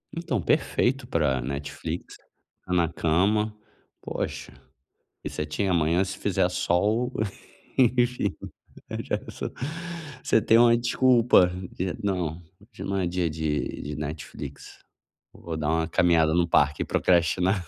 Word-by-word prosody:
Então, 165 - -2
perfeito 120 - +1
para 75 -6 +1
Netflix. 70 +3 -5 0.5
Na 90 -2 +2
cama, 100 +7 +1 0.5
poxa, - - -5 0.7
e - - -2
você - - -4
tinha 95 +6 -1
amanhã, 85 +2 +2
se 95 - -5
fizer - - +1
sol, 110 +8 +1 0.7
enfim, 125 0 +3 0.7
já - - -1
é - - -8
só - - -5 0.8
você 110 - +3
tem 115 - +5
uma 120 0 +6
desculpa 120 -5 +4 0.2
de: 90 0 -3
"Não, 90 -5 -1 0.2
hoje 105 +1 -11
não 100 - -2
é 95 - 0
dia 85 -1 0
de 75 -1 -2
de 75 0 -5
Netflix. 75 -2 -7 0.5
Eu - - -16
vou 80 -2 -5
dar 75 -1 -2
uma 80 0 +1
caminhada 80 -2 +3
no 85 0 +2
parque 70 -3 +3
e - - -8
procrastinar." 90 +3 +2
90 Hz, 135 wpm, -26 LUFS, 80-110 Hz, 0.8 s, uma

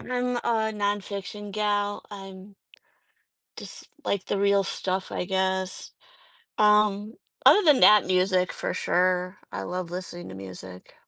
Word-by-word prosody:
I'm 250 0 -2
a 220 -2 0
nonfiction 205 0 -3
gal, 205 0 -1
I'm 195 0 -10 1.0
just - - -8 0.2
like 200 -2 -1
the 200 - -1
real 200 0 +3
stuff, 190 0 -3
I - - -2
guess. 190 0 -1 0.7
Um, 210 0 +3 0.3
other 420 - +8
than 300 -5 +5
that, 210 -3 +7
music, 185 0 +2
for - - -3
sure. 180 +1 0
I - - -4
love 180 -1 -4
listening 175 -1 -7
to 95 - -9
music. 95 -1 -10
195 Hz, 130 wpm, -26 LUFS, 185-210 Hz, 1.0 s, other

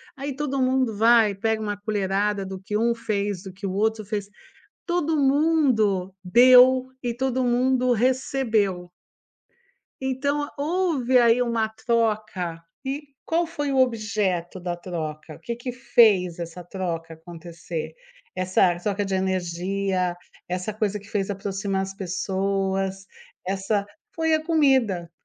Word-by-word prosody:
aí, 275 0 -4
todo 275 -1 -2
mundo 255 -3 +1
vai, 225 -1 +5
pega 220 +2 -1
uma 205 -1 -2
colherada 205 -1 -1
do 190 0 -6
que 210 +2 -2
um 235 +2 +2
fez, 205 -4 -2
do 190 - -8
que 195 +2 -6
o 185 - -3
outro 215 +2 0
fez, 205 -1 -3 0.6
todo 345 -3 0
mundo 270 - +2
deu 255 +5 +7 0.2
e 240 -2 -2
todo 260 0 0
mundo 250 +1 +2
recebeu. 225 -7 0 1.1
Então, 280 +3 -1
houve 295 -5 +1
aí 240 0 +5
uma 235 -2 +1
troca 215 -7 -1 0.2
e 285 +2 -4 0.2
qual 335 +1 +1
foi 290 -3 -3
o 270 - 0
objeto 210 -7 0
da 175 -1 -3
troca? 155 -3 -6
O - - -16
que 235 - -5
que 245 +2 -5
fez 225 -8 +3
essa 170 +1 -7
troca 165 -3 -5
acontecer? 165 0 -7 0.4
Essa 185 -1 +2
troca 205 +2 -1
de 195 -1 -2
energia, 185 0 -1 0.3
essa 180 +4 -3
coisa 210 -1 -2
que 200 - -16
fez 205 -2 -1
aproximar 195 0 -2
as 195 0 -5
pessoas, 195 0 -2 0.4
essa 195 +2 -1 0.3
foi 320 -1 +2
a 310 - -2
comida, 265 - +2
210 Hz, 135 wpm, -24 LUFS, 190-255 Hz, 1.1 s, deu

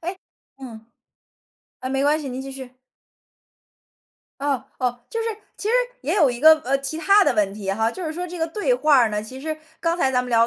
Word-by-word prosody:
哎， 355 +3 -4 0.4
嗯。 225 -4 -10 0.9
哎， 255 - -4
没 270 +1 0
关 300 +2 +3
系， 290 - -6
您 255 +1 -5
继 270 0 -7
续。 260 -1 -10 1.6
哦 280 -3 -1
哦。 245 -1 -1
就 455 - -2
是， 460 - -2 0.3
其 415 - -4
实 475 - +2 0.3
也 - - -1
有 305 -10 +4
一 240 0 -6
个， 315 +2 +9
呃， 270 +2 +2
其 275 +3 -5
它 400 +4 +5
的 - - +3
问 205 -2 +1
题 200 -2 -4
哈， 220 +3 +1
就 365 +8 -7
是 315 - -3
说 355 +2 -4
这 355 0 -8
个 325 - 0
对 420 +9 0
话 305 - +4
儿 235 -3 +4
呢， 210 0 -2
其 255 +5 -9
实 310 +2 -3 0.2
刚 335 +1 0
才 270 -6 +2
咱 250 -1 +1
们 250 - -7
聊 230 -2 +4
270 Hz, 240 characters per minute, -23 LUFS, 245-325 Hz, 1.6 s, 个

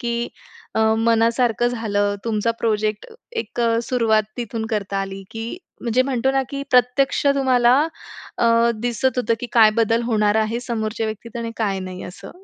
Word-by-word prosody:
की 235 0 -2 0.5
अ, 220 - +1 0.2
मनासारखं 230 +1 +2
झालं. 205 -4 -1
तुमचा 225 0 0
प्रोजेक्ट, 215 -1 -1 0.3
एक 245 - -4
अ, 230 -1 +2
सुरुवात 225 -3 +2
तिथून 230 -2 -4
करता 200 -2 -2
आली, 195 0 -4
की 225 +7 -5 0.2
म्हणजे 240 +1 +2
म्हणतो 265 -1 0
ना 270 0 +2
की 280 0 -4
प्रत्यक्ष 250 +3 +2
तुम्हाला, 255 -3 +3 0.7
अ, - - +3 0.3
दिसत 245 +2 0
होतं 230 -1 +1
की 245 - -4
काय 220 -2 +7
बदल 230 +1 +2
होणार 215 -3 +1
आहे 220 +2 0
समोरच्या 225 -2 -3
व्यक्तीत 220 +2 -7
आणि 230 -1 -4
काय 200 -4 -1
नाही 185 0 -7
असं. 195 +2 -10
230 Hz, 160 wpm, -21 LUFS, 215-245 Hz, 0.7 s, काय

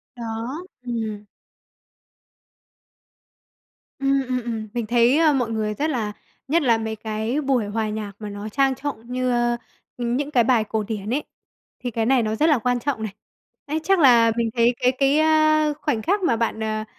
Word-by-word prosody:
Đó, 235 +7 -5 0.2
ừm. 220 -4 -4 2.7
Ừm, 275 0 +2
ừm, 255 -1 -1
ừm, 225 -2 -4
mình 235 -2 -2
thấy 240 +5 +3
mọi 245 -4 0
người 215 -1 -1
rất 300 +8 -1
là 220 -7 -1 0.4
nhất 325 +4 +2
là 235 -4 +4
mấy 220 0 -3
cái 220 +6 -2
buổi 265 -6 +1
hòa 215 +1 -2
nhạc 210 -1 -4
mà 210 -1 -6
nó 205 +1 -6
trang 270 +3 +2
trọng 250 -4 -6
như 255 0 0 0.6
những 250 +5 -1
cái 240 -4 +4
bài 235 -2 +3
cổ 215 0 -2
điển 210 -1 -5
ấy, 295 +3 0 0.6
thì 245 - -2
cái 225 0 -1
này 255 -1 +3
nó 215 0 -1
rất 310 +8 +3
là 295 - +4
quan 245 +2 0
trọng 255 -3 -2
này. 215 -3 -4 0.5
Ấy, 305 +2 -2
chắc 390 -2 +3
là 235 -5 +6
mình 230 -1 +1
thấy 235 +1 +3
cái 250 - +4
cái, 275 +3 +2
ơ, 310 -1 +3
khoảnh 265 -8 0
khắc 390 - +1
mà 240 - +3
bạn, 225 -1 -1
à, 215 0 -2
240 Hz, 180 wpm, -23 LUFS, 220-275 Hz, 2.7 s, là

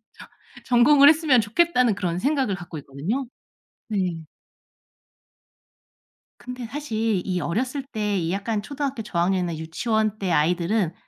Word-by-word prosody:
저 - - -14 0.4
전공을 275 +4 +6
했으면 300 -5 +4
좋겠다.'는 250 +1 +2
그런 175 -2 -2
생각을 270 -6 +1
갖고 175 -3 -8
있거든요. 165 - -4 0.6
네. 180 -7 -2 2.1
근데 250 -1 -7
사실 225 -7 -2
이 180 -2 -2
어렸을 250 - -2
때 210 -2 -1
이 170 -1 -2
약간 205 +2 -2
초등학교 275 -1 -4
저학년이나 175 -3 -1
유치원 215 +7 -1
때 195 -3 -2
아이들은 170 +3 +1
210 Hz, 280 characters per minute, -24 LUFS, 175-250 Hz, 2.1 s, 전공을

